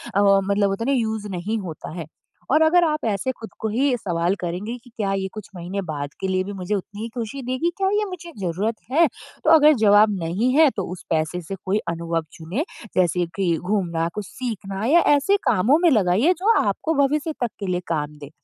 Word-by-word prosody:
अ, 200 - +4
मतलब 200 0 +3
होता 195 +4 -2
ना 275 - +1
यूज़ 220 -4 -1
नहीं 195 +5 -2
होता 170 -6 -7
है। 160 - -5 0.5
और 310 +3 +5
अगर 345 +2 +5
आप 305 -5 0
ऐसे 205 +6 -1
ख़ुद 225 -3 -10
को 220 - -2
ही 255 +4 +2
सवाल 175 -2 0
करेंगे 180 +7 -3
कि 245 - -16
क्या 200 -2 0
ये 195 0 -1
कुछ 215 -2 -8
महीने 180 +3 -4
बाद 145 -5 -4
के 190 - -2
लिए 185 0 +1
भी 200 +1 -6
मुझे 190 +2 -2
उतनी 205 +2 -6
ही 230 - -3
खुशी 245 +3 -4
देगी? 255 +7 0
क्या 385 -1 +1
ये 420 0 +1
मुझे 345 -2 -8
ज़रूरत 195 +5 -1 0.2
है? 325 +3 +5 0.4
तो - - +2
अगर 305 -1 +7
जवाब 210 +1 +6
नहीं 185 +10 0
है, 310 0 +6
तो 200 -6 -4
उस 180 - -8
पैसे 160 +2 0
से 195 +4 -6
कोई 195 +2 +1
अनुभव 165 -1 -2
चुने। 185 - -3 0.3
जैसे 180 0 +2
कि 175 -4 +1
घूमना, 175 -3 -1
कुछ 210 -1 -4
सीखना 200 -5 -5
या 325 +7 +5 0.2
ऐसे 390 +9 +2
कामों 240 - +4
में 345 - +7
लगाइए 215 - +3
जो 435 +5 +4
आपको 325 - -1
भविष्य 300 +3 0
तक 240 - +1
के 200 - -4
लिए 180 -1 0
काम 150 -2 -2
दें। 145 -1 -9
205 Hz, 215 wpm, -23 LUFS, 180-260 Hz, 0.5 s, अगर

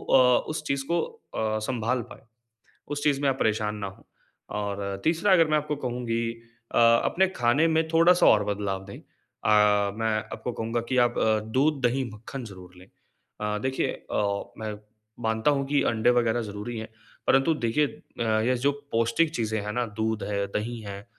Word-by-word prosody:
अ, 125 -2 +5
उस 155 0 -3
चीज़ 140 0 -1
को 170 - +2 0.3
अ, 110 0 0
सँभाल 125 0 -1
पाए, - - -12 0.7
उस 145 0 -4
चीज़ 140 -1 +2
में 140 - +2
आप 135 - -2
परेशान 105 -1 0
ना 100 -2 -4
हों 95 - -12 0.6
और 100 -1 -4
तीसरा 170 +5 +2
अगर 165 -4 +6
मैं 155 0 +3
आपको 150 0 -2
कहूँगी 120 -1 -2 0.5
अ, - - +2
अपने 115 +11 +4
खाने 120 +7 +3
में 160 0 +2
थोड़ा-सा 165 +2 +5
और 105 -1 +5
बदलाव 100 -2 -2
दें, 100 - -9
अ, 105 -1 +1
मैं 110 -1 0
आपको 125 - -5
कहूँगा 115 +1 -2
कि 130 - +1
आप 120 - -8
अ, 110 -1 +3 0.2
दूध, 145 0 +2
दही, 130 +2 +1
मक्खन 120 +5 -8
ज़रूर 90 -3 -12
लें। 90 +1 -15 0.5
अ, 105 0 -1
देखिए 130 0 0 0.2
अ, 100 -1 0
मैं 110 -1 -4 0.5
मानता 110 +5 +2
हूँ 140 -1 0
कि 145 0 +2
अंडे 115 +1 +2
वग़ैरह 120 -1 +2
ज़रूरी 105 +3 -6
हैं, 110 - -6 0.4
परंतु 135 +5 +4
देखिए 145 +6 +2
अ, 110 -4 -3
ये 130 - +3
जो - - +4 0.2
पौष्टिक 115 +9 +2
चीज़ें 110 -1 -1
हैं 105 +1 -4
ना, 120 0 0
दूध 110 0 -1
है, 100 -1 -1
दही 115 +2 -3
हैं 100 0 -8
115 Hz, 180 wpm, -26 LUFS, 105-135 Hz, 0.7 s, अगर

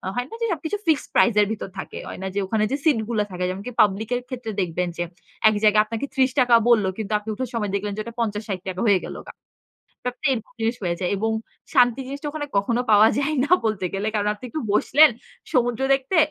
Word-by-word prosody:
হয় 245 +1 -2
না - - -12
যে, - - +2
সবকিছু 330 +5 -3
ফিক্সড 310 -3 +1
প্রাইস 235 -3 +4
এর 205 - +2
ভিতর 205 -3 -5
থাকে। - - -7
হয় - - -7
না 190 - -3
যে, - - +1
ওখানে 215 +2 0
যে, - - +2
সিট 295 -8 +3
গুলো 215 -3 +1
থাকে 180 0 -4
যেমনকি 200 +7 -5
পাবলিক 210 +2 +1
এর 245 - -2
ক্ষেত্রে 245 -4 -5
দেখবেন 180 0 -1
যে, 175 - 0 0.5
এক - - +1
জায়গায় 210 0 +5
আপনাকে 230 +4 -4
৳৩০ 260 -2 +4
বলল 215 -5 +5
কিন্তু 220 -1 -5
আপনি 210 - -9
উঠার 255 +4 -4
সময় 210 -4 -2
দেখলেন 200 +1 -2
যে, 215 - -1
ওটা 235 0 -9
৳৫০-৳৬০ 200 -4 -3
হয়ে 195 -3 +5
গেলগা। - - -9 0.7
ব্যাপারটা 250 +3 -2
এরকম 225 0 -7
জিনিস 225 +2 0
হয়ে 175 -2 -1
যায় 180 - -1
এবং 220 +3 0 0.4
শান্তি 245 0 +4
জিনিসটা 280 +2 -5
ওখানে 295 -1 -4
কখনো 235 +4 0
পাওয়া 215 +1 +7
যায় 285 +2 0
না 335 - -1
বলতে 200 -4 -1
গেলে। 205 +3 -1
কারণ 210 0 +1
আপনি 210 - -14
একটু 315 - -3
বসলেন 295 +8 +6 0.4
সমুদ্র 245 -2 +1
দেখতে 270 +7 -2
225 Hz, 215 wpm, -23 LUFS, 205-255 Hz, 0.7 s, পাওয়া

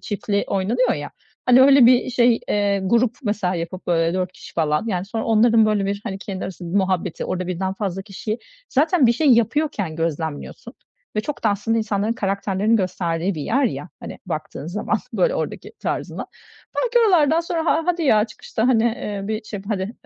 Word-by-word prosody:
çiftli 205 -1 -2
oynanıyor, 230 +6 +1
ya, 145 0 -6 0.4
hani, 250 +1 +7
öyle 275 -3 +7
bir 250 +1 +4
şey, 240 -1 +3
eee, 200 -1 +1
grup, 235 +4 +2
mesela, 205 -5 -1
yapıp, 170 +2 -5
böyle, 165 0 +1
4 185 -1 -2
kişi, - - -13
falan, 155 +5 0
yani, 185 -4 -1
sonra 220 +2 -4
onların, 225 0 +4
böyle, 205 -2 +1
bir, 200 0 -2
hani, 195 -4 -4
kendi 195 -2 -5
arası 185 -1 -7
muhabbeti, 185 -1 -1
orada 185 0 -3
1'den 185 +1 -2
fazla 195 -2 -3
kişiyi, 215 +2 -5 0.3
zaten, 300 0 +3
bir 235 - +5
şey 305 +6 0
yapıyorken 230 - +1
gözlemliyorsun 160 -2 -4 0.4
ve - - +3
çok 285 +4 -6
da, - - +5
aslında, 210 +3 0
insanların 215 0 0
karakterlerinin 200 +1 0
gösterdiği 180 -2 -1
bir 155 - -4
yer, 270 - +1
ya, 245 - -2
hani, - - -8
baktığın - - -5
zaman - - -1 0.2
böyle - - +2
oradaki - - -4
tarzından. - - -3 0.5
Belki 485 -1 +2
oralardan 320 -3 +4
sonra 335 -1 -2
ha 330 - +3
hadi, 355 -1 0
ya, 215 -8 +4
çıkışta, 220 +2 -3
hani, 230 -3 +3 0.3
ııı, 195 - -6
bir 220 0 -3
şey 210 -1 -6
yap 195 - -12
hadi, 200 0 -2
210 Hz, 185 wpm, -22 LUFS, 190-240 Hz, 0.5 s, hani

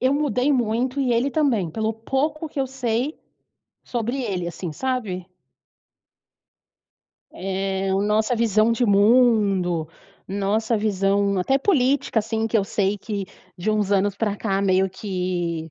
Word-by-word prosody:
eu 260 +2 +3
mudei 285 -2 +1
muito 250 +2 0
e 255 -3 +1
ele 245 +4 +1
também, 250 - +1
pelo 220 +5 -1
pouco 290 +7 -2
que 285 - -4
eu 265 - 0
sei 255 +2 -2 0.6
sobre 240 +2 -3
ele, 185 -6 -2
assim, 170 -1 -5
sabe. 210 - -3 2.1
Eh, 195 0 -2
a - - +1
nossa 210 +4 +1
visão 220 -1 +3
de 235 +2 +1
mundo, 200 -6 +3 0.4
nossa 205 +4 0
visão 200 -1 +1
até 265 +9 +2
política, 275 - +2
assim, 220 +1 -1
que 225 0 +2
eu 200 - +2
sei 200 0 0
que 200 -1 -4 0.3
de 180 +5 -1
uns 210 -2 0
anos 200 0 +2
pra 210 0 -1
cá 195 -3 -1
meio 190 -1 +2
que, 180 -4 -3
215 Hz, 140 wpm, -23 LUFS, 195-250 Hz, 2.1 s, eu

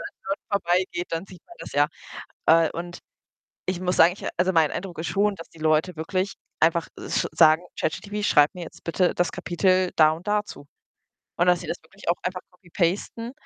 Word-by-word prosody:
den - - -36
Leuten 195 - -3
vorbeigeht, 180 -2 0
dann 165 +2 -2
sieht 185 -3 -14
man 345 - -15
das - - -8
ja. 145 +1 +4 0.6
Äh, 165 0 +5
und 175 +1 -6 0.7
ich 185 -1 -2
muss 180 -1 0
sagen 170 +2 +6
ich 195 - -10
also, 180 +2 +2
mein 160 -3 +4
Eindruck 180 -3 -6
ist 160 - -3
schon, 205 0 +1
dass 165 - -11
die 165 - -18
Leute 155 +3 +1
wirklich 185 +4 -2 0.3
einfach 165 +1 +3 0.2
sch - - +1
sagen: 160 0 +6 0.2
„ChatGPT, 205 +6 -3
schreib 150 -7 +4
mir 180 - -6
jetzt 165 - -12
bitte 175 +2 +1
das 175 - +1
Kapitel 185 +1 +1
da 155 -1 +7
und 165 +5 -7
da 210 0 +2
zu.“ 145 - -11 0.7
Und 175 - +2
dass 180 -1 +4
sie - - -8
das - - -3
wirklich 195 +5 -11
auch 175 - +1
einfach 180 0 -3
copy-pasten 185 +6 -2
175 Hz, 200 wpm, -25 LUFS, 165-190 Hz, 0.7 s, da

